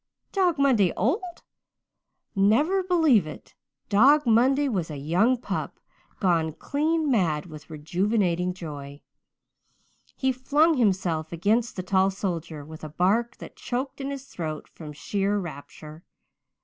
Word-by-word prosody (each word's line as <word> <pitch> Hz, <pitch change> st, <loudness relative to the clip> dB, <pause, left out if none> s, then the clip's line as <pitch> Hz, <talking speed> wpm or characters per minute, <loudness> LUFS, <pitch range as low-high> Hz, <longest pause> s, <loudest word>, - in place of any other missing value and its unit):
Dog 365 Hz, -5 st, +1 dB
Monday 245 Hz, -10 st, +3 dB
old? 345 Hz, -, -1 dB, 0.9 s
Never 260 Hz, -, +3 dB
believe 320 Hz, -, +3 dB
it. 155 Hz, -, -11 dB, 0.3 s
Dog 270 Hz, +9 st, +5 dB
Monday 260 Hz, +5 st, +3 dB
was 185 Hz, -10 st, -2 dB
a 150 Hz, -, -6 dB
young 180 Hz, -, +2 dB
pup, 240 Hz, -, -5 dB, 0.4 s
gone 165 Hz, -5 st, +1 dB
clean 310 Hz, -, -1 dB
mad 170 Hz, -, +1 dB
with 155 Hz, -2 st, -12 dB
rejuvenating 180 Hz, +3 st, 0 dB
joy. 145 Hz, -5 st, -8 dB, 1.1 s
He 265 Hz, 0 st, +1 dB
flung 290 Hz, +5 st, +2 dB
himself 185 Hz, -8 st, 0 dB
against 210 Hz, +7 st, 0 dB
the 185 Hz, -, -4 dB
tall 190 Hz, +1 st, +2 dB
soldier, 170 Hz, -6 st, -4 dB
with 155 Hz, +1 st, -11 dB
a 155 Hz, -, -6 dB
bark 200 Hz, +10 st, 0 dB
that -, -, -11 dB
choked 260 Hz, +3 st, -4 dB
in 270 Hz, -, -3 dB
his 275 Hz, -1 st, -6 dB
throat 155 Hz, -, -6 dB
from 155 Hz, -3 st, -10 dB
sheer 200 Hz, +7 st, -1 dB
rapture. 155 Hz, -2 st, -8 dB
200 Hz, 130 wpm, -25 LUFS, 165-265 Hz, 1.1 s, Dog